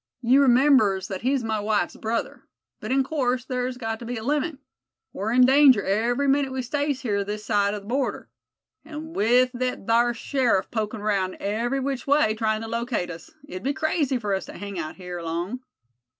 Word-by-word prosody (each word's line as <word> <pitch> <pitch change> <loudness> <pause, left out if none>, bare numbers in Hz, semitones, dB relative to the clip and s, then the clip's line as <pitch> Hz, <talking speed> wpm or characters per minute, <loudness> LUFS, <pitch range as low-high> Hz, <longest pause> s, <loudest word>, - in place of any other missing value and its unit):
"You 255 +4 +5
remembers 245 -8 +4
that 190 -2 -4
he's 265 +1 0
my 220 -1 -1
wife's 210 0 0
brother. 225 +1 -3 0.4
But - - -5
in 270 +1 +3
course 255 -3 -1
thar's 250 -1 -3
got 225 -2 -4
to 235 - -8
be 245 +1 -4
a 220 - -6
limit. 295 +3 -1 0.6
We're 210 +3 -3
in 250 +1 +6
danger 265 -5 +6
every 235 +8 +1
minit 275 0 +2
we 260 -1 -3
stays 285 +1 -1
here 205 -5 0
this 210 +1 -5
side 205 -1 +1
the 205 - -6
border. 250 +7 -2 0.6
An' 315 +1 -8
with 245 +3 +3
thet 250 -4 -3
thar 235 +2 +3
sheriff 235 -6 0
pokin' 215 -1 -3
'raound 195 -3 0
every 235 +6 -1
which 270 -1 -3
way, 280 -6 +3
tryin' 220 0 -1
to - - -5
locate 230 -5 -2
us, 170 - -10 0.2
it'd 185 -9 -7
be 275 +5 -1
crazy 305 -3 0
fur 210 -4 -2
us 190 - -2
to - - -10
hang 200 -2 -6
out 155 -1 -5
here 180 -2 -7
long." 170 +8 -3
240 Hz, 195 wpm, -24 LUFS, 210-265 Hz, 0.6 s, in